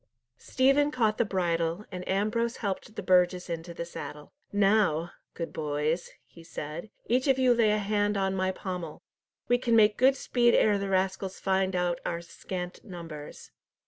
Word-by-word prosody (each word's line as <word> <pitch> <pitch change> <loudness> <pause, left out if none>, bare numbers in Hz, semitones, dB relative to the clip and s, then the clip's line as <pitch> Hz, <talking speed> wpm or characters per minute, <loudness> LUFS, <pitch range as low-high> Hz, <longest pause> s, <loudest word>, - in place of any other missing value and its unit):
Stephen 275 +3 +3
caught 225 -6 +1
the - - +5
bridle, 175 -1 -1
and 180 -1 -6
Ambrose 220 +5 0
helped 205 +2 -4
the 205 - -5
burgess 180 -1 +3
into 165 +1 -5
the 170 0 -5
saddle. 150 -3 -8 0.2
"Now, 195 -5 +2 0.2
good 165 - -5
boys," 155 +2 -1 0.2
he 165 - -16
said, 165 +3 -7 0.2
"each 255 +4 +1
of 270 -1 +4
you 255 -2 +4
lay 230 -2 +3
a 210 - +3
hand 205 0 0
on 195 -1 0
my 185 0 +1
pommel. 180 -4 -6 0.4
We 245 0 +3
can 235 -2 +2
make 210 -1 +5
good 265 +2 +5
speed 240 -2 +3
ere 205 -2 +4
the 200 0 -3
rascals 190 0 -1
find 190 -1 +1
out 175 -1 0
our 170 0 -3
scant 180 +1 -7
numbers." 165 -6 -9
190 Hz, 170 wpm, -28 LUFS, 170-215 Hz, 0.4 s, the